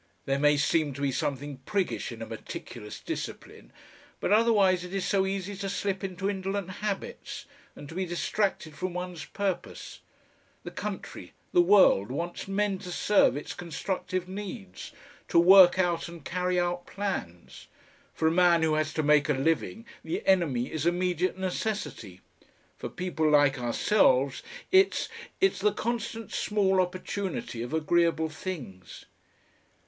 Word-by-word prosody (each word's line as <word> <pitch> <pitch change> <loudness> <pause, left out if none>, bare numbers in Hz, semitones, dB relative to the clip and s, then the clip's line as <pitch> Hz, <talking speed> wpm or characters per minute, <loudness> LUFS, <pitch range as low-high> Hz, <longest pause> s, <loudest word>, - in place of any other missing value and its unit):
There 135 0 0
may 150 0 +4
seem 150 0 +1
to 140 - -8
be 140 -1 +1
something 140 +1 -3
priggish 185 +6 -2
in 115 -1 -7
a - - -5
meticulous 110 -1 -8
discipline, - - -7 0.5
but - - -1
otherwise 205 -5 +4
it 180 +2 -6
is 195 - -1
so 195 -2 +2
easy 195 +1 -3
to 195 0 -3
slip 195 0 -2
into 190 0 -3
indolent 195 -1 -2
habits 210 -2 -4 0.3
and 145 - -10
to 165 - -10
be 185 +1 -2
distracted 175 -1 -1
from 180 +3 -4
one's 180 -4 -5
purpose. 195 -1 -4 0.6
The - - -7
country, - - -6 0.2
the 355 - +6
world, 195 - +5
wants 170 +9 -4
men 195 0 0
to 180 - -8
serve 200 -6 +3
its 145 - -6
constructive 185 +1 -3
needs, 185 - -7 0.4
to - - +1
work 185 +1 +8
out 175 -3 +1
and 170 -4 -11
carry 180 0 0
out 175 0 -2
plans. 185 - -5 0.5
For 160 - +1
a - - +4
man 170 -1 +4
who 160 -1 +2
has 155 0 -1
to 155 - 0
make 150 0 +4
a - - +4
living 165 - -1 0.2
the 160 - -4
enemy 160 -11 +2
is 155 +1 -1
immediate 180 +1 0
necessity; 185 - -4 0.5
for - - -6
people 165 -4 -1
like 145 -2 +4
ourselves 130 - +2 0.3
it's 385 +1 +4 0.3
it's 385 - +2
the 210 +2 +3
constant 230 -1 -3
small 195 -3 +2
opportunity 185 - -4
of 120 - -5
agreeable 160 0 +2
things." 145 - -8
180 Hz, 150 wpm, -28 LUFS, 150-195 Hz, 0.6 s, work